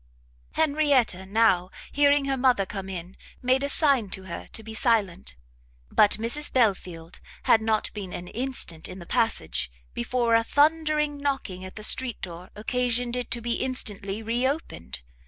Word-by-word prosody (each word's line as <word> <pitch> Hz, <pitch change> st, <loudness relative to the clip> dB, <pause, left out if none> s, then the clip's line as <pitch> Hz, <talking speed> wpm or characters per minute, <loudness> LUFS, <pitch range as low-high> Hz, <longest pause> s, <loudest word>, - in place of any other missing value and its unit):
Henrietta 285 Hz, -, +2 dB
now, 195 Hz, -4 st, +3 dB, 0.2 s
hearing 285 Hz, 0 st, +4 dB
her 275 Hz, 0 st, 0 dB
mother 250 Hz, -6 st, +3 dB
coming 195 Hz, -1 st, -6 dB
in, 175 Hz, +2 st, -8 dB, 0.3 s
made 255 Hz, +2 st, +3 dB
a 280 Hz, -, -1 dB
sign 275 Hz, -8 st, +2 dB
to 190 Hz, 0 st, -4 dB
her 170 Hz, -3 st, -7 dB
to 220 Hz, -, -6 dB
be 220 Hz, +1 st, -8 dB
silent; 210 Hz, -, 0 dB, 0.6 s
but 205 Hz, -, +5 dB
Mrs 235 Hz, +7 st, +1 dB
Belfield 185 Hz, -8 st, 0 dB, 0.2 s
had 225 Hz, -, +5 dB
not 220 Hz, -1 st, 0 dB
been 195 Hz, -4 st, -6 dB
an 175 Hz, 0 st, -6 dB
instant 240 Hz, -10 st, -1 dB
in 185 Hz, -, -9 dB
the 175 Hz, -, -10 dB
passage, 125 Hz, -, 0 dB, 0.2 s
before 235 Hz, -, 0 dB
a 230 Hz, 0 st, +5 dB
thundering 300 Hz, +1 st, +2 dB
knocking 270 Hz, -10 st, -3 dB
at 185 Hz, -, -9 dB
the 215 Hz, -, -8 dB
street 245 Hz, +1 st, +1 dB
door 175 Hz, 0 st, -8 dB
occasioned 245 Hz, +2 st, +1 dB
it 250 Hz, -1 st, -3 dB
to 240 Hz, -, -1 dB
be 235 Hz, 0 st, -1 dB
instantly 210 Hz, -5 st, -2 dB
re 240 Hz, +3 st, +1 dB
opened. 85 Hz, -, -4 dB
230 Hz, 160 wpm, -26 LUFS, 190-265 Hz, 0.6 s, but